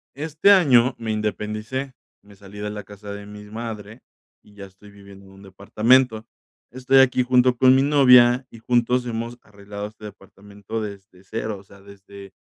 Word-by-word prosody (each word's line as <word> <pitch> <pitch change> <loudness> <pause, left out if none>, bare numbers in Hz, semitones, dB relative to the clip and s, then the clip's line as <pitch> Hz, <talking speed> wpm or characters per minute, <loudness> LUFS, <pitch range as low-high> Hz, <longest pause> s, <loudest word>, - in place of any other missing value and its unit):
este 155 +6 +1
año 130 -10 +4
me 115 -1 -4
independicé, 110 +5 -4 0.3
me 100 0 -19
salí 100 +1 -14
de 105 - -4
la 105 0 -7
casa 105 0 -11
de 100 0 -9
mis 105 0 -12
madre, 110 0 -8 0.4
y 105 - -22
ya 100 -1 -11
estoy 100 +2 -18
viviendo 100 -1 -16
en 95 - -18
un 95 0 -17
departamento. 110 +4 +1 0.5
Estoy 130 +1 +2
aquí 130 -1 +3
junto 125 0 +2
con 130 +1 +5
mi 135 - +3
novia, 125 -3 +5
y 115 - -13
juntos 125 +1 0
hemos 115 +1 -5
arreglado 100 0 -9
este 105 0 -15
departamento 100 +1 -10
desde 100 -2 -10
0. 110 +1 -5
O 95 - -15
sea, 100 0 -19
desde 100 -1 -14
105 Hz, 175 wpm, -22 LUFS, 100-125 Hz, 0.5 s, con